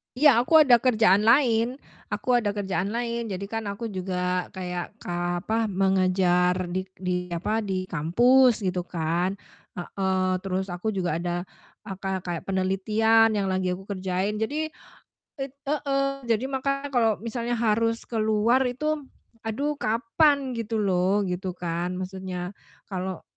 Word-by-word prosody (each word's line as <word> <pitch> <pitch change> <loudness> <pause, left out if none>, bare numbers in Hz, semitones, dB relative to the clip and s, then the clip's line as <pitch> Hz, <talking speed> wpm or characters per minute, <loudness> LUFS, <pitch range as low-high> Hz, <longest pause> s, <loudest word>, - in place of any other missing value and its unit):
Iya, 290 +3 +6
aku 315 +5 +6
ada 245 -4 +6
kerjaan 215 -4 +4
lain 240 -1 +4 0.3
aku 240 +4 +1
ada 205 -2 -2
kerjaan 195 -2 -1
lain, 235 -1 -2
jadi 195 -1 -4
kan 225 -2 -3
aku 215 +2 -4
juga 180 -1 -2
kayak 180 -1 -5
ka 175 0 -2
apa, 225 +1 0
mengajar 185 -2 +2 0.2
di 185 +1 -2
di 180 -1 -2
apa, 180 +6 -1
di 190 -3 -2
kampus, 230 - +3
gitu 185 -1 0
kan, 170 +3 -1 0.4
heeh. 185 0 -1
Terus 190 0 -3
aku 180 +5 -5
juga 175 -3 -1
ada 175 0 -2 0.4
aka 190 -1 -4
kayak 175 0 -5
penelitian 215 +4 +3
yang 195 -2 0
lagi 185 -1 0
aku 190 - -11
kerjain. 190 +2 -2
Jadi 305 +7 -2 0.7
it 270 0 -5
heeh, 275 -2 -1
jadi 230 +2 +1
makanya 275 +1 -2
kalo 225 -5 +2
misalnya 235 +1 -2
harus 230 0 +1
keluar 225 +3 +2
itu, 305 +5 -1 0.5
aduh 285 +7 -2
kapan 265 +5 +2
gitu 225 0 -3
loh, 190 +1 +2
gitu 185 0 -3
kan 175 +1 -3
maksudnya 185 -1 -5 0.4
kalo 185 -1 -4
200 Hz, 140 wpm, -26 LUFS, 185-235 Hz, 0.7 s, Iya